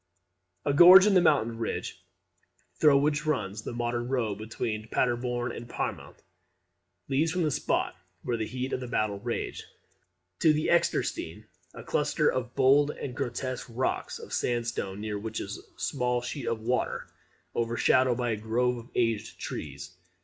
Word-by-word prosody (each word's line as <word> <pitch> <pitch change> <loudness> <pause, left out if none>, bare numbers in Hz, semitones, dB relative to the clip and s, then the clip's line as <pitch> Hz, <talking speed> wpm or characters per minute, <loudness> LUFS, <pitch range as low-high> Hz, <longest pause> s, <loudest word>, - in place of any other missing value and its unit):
A 145 - +2
gorge 180 +5 +10
in 210 - +4
the 185 - +6
mountain 115 -9 +2
ridge, 115 - -4 0.8
through 150 -3 +6
which 150 +2 +1
runs 105 -8 -1
the - - -6
modern 120 0 -2
road 115 -6 -1
between 110 0 -4
Paderborn 120 0 0
and 120 +1 -8
Pyrmont, - - -4 0.9
leads 155 +4 +1
from 180 0 0
the 155 - +1
spot - - 0 0.3
where 125 - -1
the 110 -2 -2
heat 130 +1 -4
of - - 0
the 125 - -6
battle 110 -4 -1
raged, - - -4 0.8
to 155 - +5
the 155 +1 0
Extersteine, 170 - 0 0.3
a - - -8
cluster 150 +1 +1
of 125 -1 -4
bold 140 +2 +5
and 135 -3 -6
grotesque 130 +1 -3
rocks 120 +3 -2
of - - -10
sandstone; 115 -5 -2
near 105 -1 -3
which 110 +1 -4
is - - -5
a - - -21
small 125 0 0
sheet 120 +2 -5
of 115 -1 -1
water, 125 +3 -1 0.5
overshadowed 120 +2 +2
by 120 -2 0
a 110 - -1
grove 120 +3 0
of 115 +2 -13
aged 115 -2 -1
trees. - - -6
120 Hz, 160 wpm, -28 LUFS, 115-140 Hz, 0.9 s, gorge